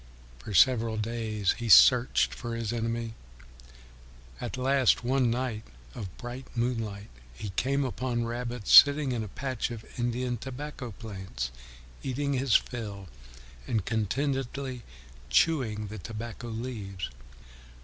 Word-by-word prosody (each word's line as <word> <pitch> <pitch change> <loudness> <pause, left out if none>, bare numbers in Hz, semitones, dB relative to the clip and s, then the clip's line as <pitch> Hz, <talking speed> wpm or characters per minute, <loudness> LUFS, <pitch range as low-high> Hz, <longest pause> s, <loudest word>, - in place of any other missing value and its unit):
For 100 +11 -6
several 115 +3 +4
days 110 -3 -1
he 120 -1 -3
searched 125 +4 +6
for 120 -2 -5
his 115 -1 -3
enemy. 115 0 -2 1.3
At - - -5
last, 130 -1 +3
one 130 0 +2
night 120 -2 -2 0.3
of 95 - -7
bright 125 +2 -7
moonlight, 115 -4 -2 0.3
he 100 +10 -6
came 135 +7 0
upon 120 -1 -2
Rabbit 120 -1 -4
sitting 145 -1 +8
in 115 -3 -1
a - - -6
patch 130 +4 -3
of 115 -2 -7
Indian 120 +1 -1
tobacco 135 +1 -6
plants, 95 - -6 0.5
eating 140 +2 -1
his 130 -4 +2
fill 100 -6 -1 0.6
and 110 -6 0
contentedly 130 +3 -2 0.5
chewing 110 - +2
the 105 +1 -7
tobacco 115 +3 -7
leaves. 110 - -5
120 Hz, 120 wpm, -29 LUFS, 110-130 Hz, 1.3 s, sitting